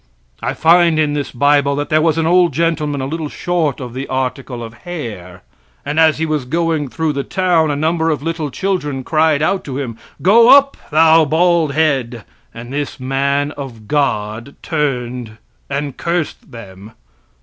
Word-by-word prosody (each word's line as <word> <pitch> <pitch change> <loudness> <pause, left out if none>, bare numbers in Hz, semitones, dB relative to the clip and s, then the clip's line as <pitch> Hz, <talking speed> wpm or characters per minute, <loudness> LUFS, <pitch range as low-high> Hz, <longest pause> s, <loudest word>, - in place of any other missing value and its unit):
I - - -2
find 170 0 +4
in 150 -2 +1
this 145 -1 -2
bible 140 +2 +2
that 145 +1 -3
there 155 0 +3
was 165 0 +2
an 165 - +1
old 175 +1 +3
gentleman 155 -4 -1
a - - -2
little 155 +2 -4
short 165 -6 -1
of 125 -3 -7
the 130 +2 -5
article 130 -1 -3
of 115 0 -8
hair. 105 - -7 0.4
And 145 +2 -1
as 160 -1 +4
he 160 - -1
was 155 -4 -2
going 160 +1 -1
through 160 +3 -2
the 140 0 -2
town 175 -3 +1
a 145 - 0
number 160 +2 0
of 150 -3 -2
little 165 -2 -3
children 150 -5 -2
cried 155 0 +2
out 190 +4 0
to 135 -2 -5
him 120 -5 -5 0.2
"Go 230 +6 +6
up, 275 +1 +6
thou 160 +1 +5
bald 165 0 +2
head!" 135 -7 0 0.3
And 120 +3 -9
this 145 -1 -4
man 140 +2 0
of 125 -8 -9
God 120 -4 -1
turned 125 -7 -3 0.3
and 140 -1 -3
cursed 170 -2 -3
them. 100 -2 -11
145 Hz, 170 wpm, -17 LUFS, 130-160 Hz, 0.4 s, Go